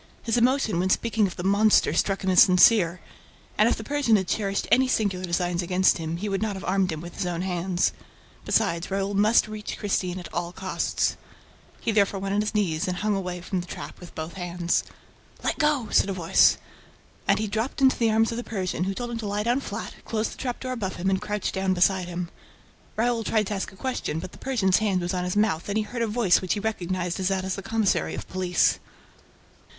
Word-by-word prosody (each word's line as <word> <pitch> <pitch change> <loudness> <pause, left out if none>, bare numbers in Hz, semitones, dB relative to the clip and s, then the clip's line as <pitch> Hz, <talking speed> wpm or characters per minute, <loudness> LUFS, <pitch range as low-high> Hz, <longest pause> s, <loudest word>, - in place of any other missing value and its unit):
His 230 - 0
emotion 240 -5 +2
when 185 +1 +1
speaking 225 +1 +2
of 180 - -8
the 175 - -6
"monster" 205 +3 +4
struck 195 -1 0
him 190 - +1
as 180 - +7
sincere; 180 -1 +5 0.5
and, - - +4
if - - +1
the - - -6
Persian 285 -6 +2
had 190 -3 +1
cherished 200 -1 -1
any 260 0 +5
sinister 200 -7 0
designs 175 0 0
against 180 +1 +2
him, 165 +1 -3
he 205 +4 -4
would 195 0 -1
not 215 -2 -1
have 190 - -7
armed 190 0 +1
him 155 -1 -5
with 170 0 -9
his 180 - -2
own 175 0 -2
hands. 180 -1 0 0.5
Besides, 180 -6 0
Raoul 195 +1 -1
must 210 +3 +4
reach 215 -1 -6
Christine 185 -3 -1
at 180 - -9
all 175 0 -3
costs. 190 0 -1 0.6
He 230 - 0
therefore 200 -2 +2
went 195 0 -3
on 205 - +2
his 210 0 -3
knees 175 -7 0
also - - 0
and 180 - -2 0.3
hung 180 -1 -4
from 185 -1 -2
the 175 - -10
trap - - -8
with 175 - -12
both 160 +1 -5
hands. 175 -1 -1 0.6
"Let - - -1
go!" 300 -6 +1
said 200 - +3
a - - -1
voice. 170 -3 +4 0.7
And - - +4
he 220 - -1
dropped 220 +5 -3
into 265 -1 +4
the 230 -1 +3
arms 225 +1 +2
of 230 - -4
the 240 - -3
Persian, 185 -5 -2
who 195 0 -2
told 240 +1 -4
him 230 - -4
to 215 - -4
lie 205 +1 -1
down 240 +4 +1
flat, - - -6
closed 220 0 -2
the - - -14
trap 245 -2 -4
door 255 - -4
above 205 -7 -3
him 190 +2 -1
and 190 0 0
crouched 210 -1 -3
down 190 -1 0
beside 185 0 +2
him. 175 -1 -4 0.7
Raoul 230 0 +1
tried 215 -1 +1
to 210 - -3
ask 195 - -3
a - - -16
question, 255 -8 -3
but 185 +3 -6
the - - -15
Persian's 215 -9 +2
hand 205 -4 +1
was 175 +1 -2
on 180 -1 -1
his 180 +3 -2
mouth 205 -5 +1
and 200 - 0
he 220 - +1
heard 235 +3 -5
a 230 - +1
voice 210 -4 +3
which 185 +1 -1
he - - -3
recognized 185 -4 -2
as 185 - 0
that 190 -1 0
of 190 - -2
the 195 - -6
commissary 220 -1 0
of - - -7
police. 185 -2 +1
195 Hz, 235 wpm, -25 LUFS, 180-220 Hz, 0.7 s, as